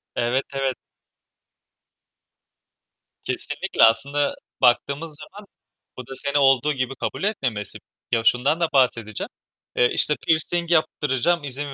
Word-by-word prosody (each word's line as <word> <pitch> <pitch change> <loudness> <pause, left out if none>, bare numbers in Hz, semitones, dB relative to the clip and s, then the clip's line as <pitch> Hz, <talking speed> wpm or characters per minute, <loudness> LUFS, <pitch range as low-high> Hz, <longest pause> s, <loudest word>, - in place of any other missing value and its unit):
Evet, 125 +3 0
evet. 135 -1 -1 2.5
Kesinlikle, - - -1
aslında 140 +6 +3 0.3
baktığımız 140 +5 +1
zaman 200 +7 -12 0.5
bu 125 -1 -9
da 135 - -8
seni 140 +1 -1
olduğu 135 +1 +3
gibi 130 0 -3
kabul - - -5
etmemesi. 130 - -2 0.3
Ya, 115 -1 +2
şundan 135 +8 +2
da 170 - +2
bahsedeceğim, 115 -5 0 0.5
eee, 120 - +3
işte, 150 - +5
pirsing 170 +2 +1
yaptıracağım, 155 0 +1
izin 140 +1 -4
140 Hz, 115 wpm, -22 LUFS, 125-150 Hz, 2.5 s, işte